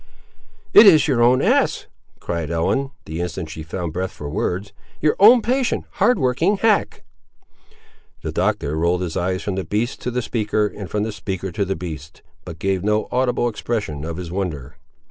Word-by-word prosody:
"It 215 - +10
is 155 -6 +6
your 130 -5 +2
own 125 +2 +4
ass," - - +2 0.3
cried 85 -3 -3
Ellen, 85 +12 0 0.2
the 80 +2 -5
instant 85 -2 -4
she 80 - -7
found 80 +1 -5
breath 95 +2 -2
for 75 -6 -8
words; 95 +7 -3 0.3
"your 150 - +2
own 225 +4 +7
patient, 255 +1 0 0.2
hard 240 +4 +4
working, 160 +8 +1
hack!" 215 -1 +1 1.2
The - - -3
Doctor 75 +2 -1
rolled 85 +3 +1
his 85 -3 -4
eyes 95 +1 -1
from 100 - -2
the 95 0 -2
beast 110 +6 -2
to - - -2
the 125 0 -2
speaker, 105 -1 0
and 100 -2 -6
from 105 0 -1
the 110 - -2
speaker 95 -2 -5
to 100 +3 -1
the 95 +1 -2
beast; 80 -3 -8 0.2
but 85 -3 -8
gave 95 +1 -1
no 105 +1 0
audible 125 -1 +1
expression 105 -10 -3
of 80 +1 -5
his 90 -2 -6
wonder. 75 -8 -4
95 Hz, 185 wpm, -21 LUFS, 85-125 Hz, 1.2 s, It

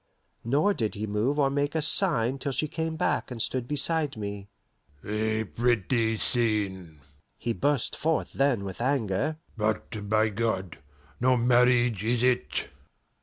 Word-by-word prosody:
Nor 145 - +2
did 110 - -2
he 105 +1 -3
move 110 +7 0
or 140 -2 +3
make 145 +2 -1
a 160 - +1
sign 140 - +2
till 140 - -2
she 155 +3 0
came 160 +1 -3
back 175 - 0
and 125 -2 -6
stood 125 +1 -1
beside 150 -1 +1
me. 100 -1 -6 0.6
"A 110 +1 -1
pretty 115 - 0
scene!" 100 - -1 0.4
he 115 - -2
burst 140 0 0
forth 160 0 -1
then 135 -7 +1
with 95 +2 -6
anger. 130 +2 0 0.2
"But, 105 -1 -2
by 110 +1 +3
God! 100 -5 -2 0.4
no 125 +1 +3
marriage 120 -3 +3
is 120 +1 +1
it!" 120 -12 0
120 Hz, 145 wpm, -27 LUFS, 105-140 Hz, 0.6 s, or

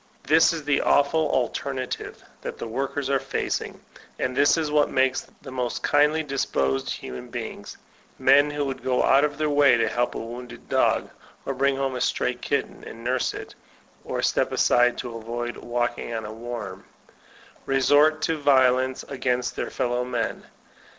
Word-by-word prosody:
This 160 +3 +5
is 165 -2 -4
the 145 -1 +2
awful 150 +2 +3
alternative 130 0 -3 0.2
that - - -6
the - - -5
workers 135 +3 -2
are 135 0 +2
fac - - -2
ing; - - -9 0.4
and 130 -1 -2
this 145 +4 +4
is 155 -2 -1
what 150 -1 +3
makes 130 0 +1 0.2
the 135 - -9
most 125 -2 -3
kindly 150 +2 +3
disposed 70 - -1
human 65 -1 -6
beings, - - -7 0.2
— - - -32
men 140 +2 +5
who 145 -1 -2
would 135 -1 -4
go 125 -1 +1
out 135 +2 +5
of 145 -1 0
their 155 -1 0
way 145 -3 +5
to 115 - +1
help 120 0 -1
a - - -2
wounded 120 +2 -8
dog, - - +1 0.3
or 135 - -2
bring 135 +1 +1
home 135 -1 -1
a 125 - -3
stray - - 0
kitten - - -3
and 115 +1 -10
nurse 125 +1 0
it, - - -8 0.5
or - - -3
step - - +1
aside 120 0 +3
to 120 -2 -5
avoid 120 +1 -4
walking 120 0 -2
on 110 -1 -4
a 105 - -6
worm 120 +1 -7 0.4
— - - -26
re* 135 0 +2
sort 150 +3 +4
to 160 -1 0
violence 130 -2 +3
against 125 -2 -2
their - - -3
felbw 125 +1 -1
men. 120 -2 -2
130 Hz, 180 wpm, -25 LUFS, 120-145 Hz, 0.5 s, This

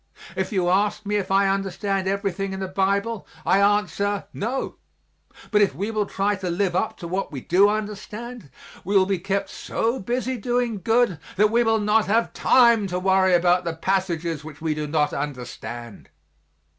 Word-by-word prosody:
If - - -2
you 185 -4 +1
ask 205 +3 +1
me 210 +1 0
if 195 - -3
I 195 +1 +3
understand 195 0 -1
everything 195 0 -2
in 190 - -5
the 190 - -3
Bible, 200 +3 -1 0.2
I 195 - +4
answer, 205 0 +1
no, 240 +6 -3 0.7
but 210 -1 +4
if 195 -9 +2
we 200 +8 -3
will 210 -2 -1
try 200 +1 0
to 185 -1 -4
live 180 +1 0
up 185 - -1
to 170 - -7
what 185 +2 -3
we 140 - -5
do 190 +9 +4
understand, 215 - -5 0.3
we 200 +2 +2
will 190 - +5
be 195 -1 -1
kept 195 +2 -2
so 230 +3 -2
busy 250 +4 -2
doing 240 -2 -1
good 225 -4 +2 0.2
that 210 +2 +3
we 235 +1 +3
will 225 -1 +3
not 210 +1 +2
have 225 +3 +1
time 235 -5 +4
to 180 -1 -3
worry 190 0 +3
about 175 +1 +3
the 170 -1 -3
passages 170 -3 -1
which 150 -1 -10
we 160 -1 -1
do 150 0 -4
not 150 -1 +1
understand. 120 -5 -6
195 Hz, 180 wpm, -23 LUFS, 180-210 Hz, 0.7 s, will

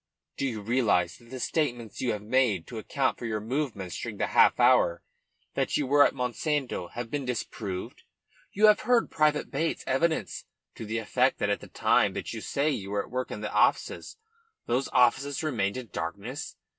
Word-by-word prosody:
"Do 135 - -1
you 110 -5 -4
realise 105 -7 +1
that 115 - -19
the 130 +1 -7
statements 120 -8 -2
you 125 - +1
have 105 -1 -6
made 110 -7 +2
to 115 - -7
account 130 +4 -1
for 120 - -4
your 110 -1 -1
movements 110 - -3
during - - -5
the - - +1
half - - +4
hour 85 0 +4 0.5
that - - 0
you 145 - 0
were 145 +2 +6
at - - +2
Monsanto 125 - -2
have 120 -1 -5
been 145 -1 -2
disproved? 105 -6 -5 0.5
You 210 +2 +3
have 210 -1 +6
heard 245 -1 +2
Private 150 -1 +1
Bates's 160 +4 -1
evidence 135 - 0 0.3
to 110 - -8
the 110 +2 -2
effect 125 +4 +1
that 100 - 0
at 100 - 0
the - - -11
time - - +2
when - - -3
you - - -5
say 145 +3 0
you 100 -8 -4
were 100 0 -1
at - - -15
work 130 0 -2
in 105 - -6
the 105 - -4
offices, 105 - +1 0.5
those 125 +3 0
offices 135 +4 +2
remained 115 -9 -1
in 125 -4 -7
darkness. 100 - -5
125 Hz, 195 wpm, -28 LUFS, 105-140 Hz, 0.5 s, were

